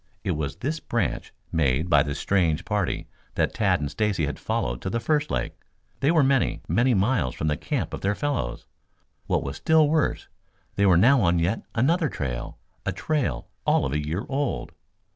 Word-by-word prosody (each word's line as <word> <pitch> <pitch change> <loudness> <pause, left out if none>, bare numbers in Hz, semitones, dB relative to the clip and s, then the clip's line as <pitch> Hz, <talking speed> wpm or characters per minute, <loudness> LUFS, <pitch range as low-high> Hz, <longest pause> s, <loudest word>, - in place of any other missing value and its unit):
It - - 0
was 75 -2 -2
this 155 +4 -3
branch - - -2 0.2
made 75 0 +1
by 75 -5 +5
the 70 0 -2
strange 85 -1 +1
party 105 -4 -1 0.3
that - - +1
Tad - - +2
and 70 -1 -2
Stacy 100 -4 0
had 75 - -4
followed - - -2
to - - -3
the 115 - -1
first 150 +4 0
lake. - - -2 0.5
They 140 - +2
were 160 -3 +4
many, 135 -2 +1
many 120 +9 +3
miles 100 - +1
from 75 - -1
the 75 - +1
camp - - -3
of - - -5
their 100 +1 +1
fellows. 125 - -2 0.6
What - - +1
was 70 0 -5
still 160 -1 +4
worse, 155 0 0 0.5
they 100 0 +2
were 90 -3 +6
now 125 +8 +5
on 85 -2 +3
yet 85 +7 0
another 155 +7 +2
trail, 60 - -4 0.3
a 95 - -1
trail 90 - -1 0.2
all - - +2
of 65 - -2
a 75 0 0
year 80 +7 -3
old. 140 -1 -2
95 Hz, 190 wpm, -25 LUFS, -, 0.6 s, were